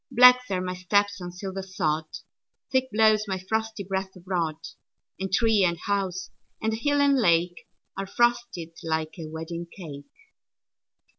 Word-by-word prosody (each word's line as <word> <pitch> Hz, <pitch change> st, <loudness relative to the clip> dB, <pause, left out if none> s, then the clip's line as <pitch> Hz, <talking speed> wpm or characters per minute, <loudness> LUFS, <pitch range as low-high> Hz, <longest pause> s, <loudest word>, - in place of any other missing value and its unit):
Black 250 Hz, +1 st, +7 dB
are 185 Hz, -2 st, 0 dB
my 180 Hz, 0 st, -3 dB
steps 200 Hz, +2 st, +1 dB
on 175 Hz, 0 st, -5 dB
silver 190 Hz, +1 st, -5 dB
sod; 160 Hz, -5 st, -1 dB, 0.7 s
Thick 260 Hz, 0 st, +2 dB
blows 215 Hz, 0 st, +4 dB
my 190 Hz, -1 st, -1 dB
frosty 220 Hz, +2 st, -2 dB
breath 190 Hz, 0 st, -3 dB
abroad; 175 Hz, -3 st, -2 dB, 0.6 s
And 190 Hz, 0 st, -3 dB
tree 220 Hz, 0 st, +4 dB
and 170 Hz, -2 st, +2 dB
house, 190 Hz, 0 st, -2 dB, 0.3 s
and 220 Hz, 0 st, 0 dB
hill 285 Hz, +6 st, +1 dB
and 280 Hz, -1 st, +4 dB
lake, 175 Hz, -2 st, +2 dB, 0.3 s
Are 195 Hz, 0 st, -4 dB
frosted 240 Hz, -6 st, 0 dB
like 160 Hz, +1 st, -2 dB
a 160 Hz, -, -5 dB
wedding 165 Hz, +2 st, -6 dB
cake. 145 Hz, -7 st, -9 dB
190 Hz, 145 wpm, -26 LUFS, 175-220 Hz, 0.7 s, Black